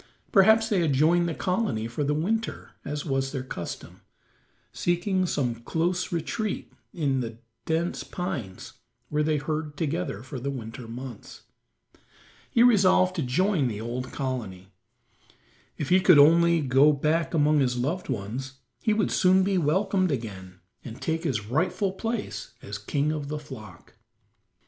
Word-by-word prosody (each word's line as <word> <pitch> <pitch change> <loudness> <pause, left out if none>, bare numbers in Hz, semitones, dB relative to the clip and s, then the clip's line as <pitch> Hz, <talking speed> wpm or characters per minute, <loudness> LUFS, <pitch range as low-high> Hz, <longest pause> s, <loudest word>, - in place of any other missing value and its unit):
Perhaps 220 +3 +5
they 205 -5 +2
had 160 -5 +2
joined 170 +5 +3
the 165 - -3
colony 180 - -1
for 120 +5 -3
the 145 +1 +1
winter, 220 +9 -2
as 145 0 -4
was 135 -2 -1
their 135 -3 -3
custom, 90 -9 -7 0.7
seeking 175 - 0
some 130 -7 0
close 170 +10 -2
retreat 180 +6 -3 0.2
in 140 -6 0
the 115 -2 -5 0.3
dense 165 +2 -1
pines 145 - -5 0.4
where 150 0 0
they 155 0 +1
herd 150 0 -3
together 155 - -2
for 130 0 -7
the 140 +3 -3
winter 115 -2 -7
months. 120 -1 -9 1.1
He 235 - +4
resolved 185 -5 +5
to - - +1
join 155 +3 +1
the 105 -3 -4
old 120 +3 -4
colony. 110 -9 -4 1.1
If 145 - -3
he 185 - +6
could 185 -4 +6
only 170 +3 +6
go 135 +2 +5
back 160 +4 0
among 150 -1 +4
his 125 -2 +1
loved 155 +9 -2
ones 125 +4 -4 0.3
he 220 - +2
would 210 -2 +1
soon 185 +1 +4
be 190 -1 +1
welcomed 185 +4 +1
again 95 -8 -6 0.2
and 115 -1 -9
take 160 +1 -2
his 110 -9 -1
rightful 170 - 0
place 225 +3 -4
as 100 0 -6
king 145 +8 -1
of 150 -2 -4
the 150 +1 -3
flock. 130 -8 -11
150 Hz, 150 wpm, -26 LUFS, 130-180 Hz, 1.1 s, he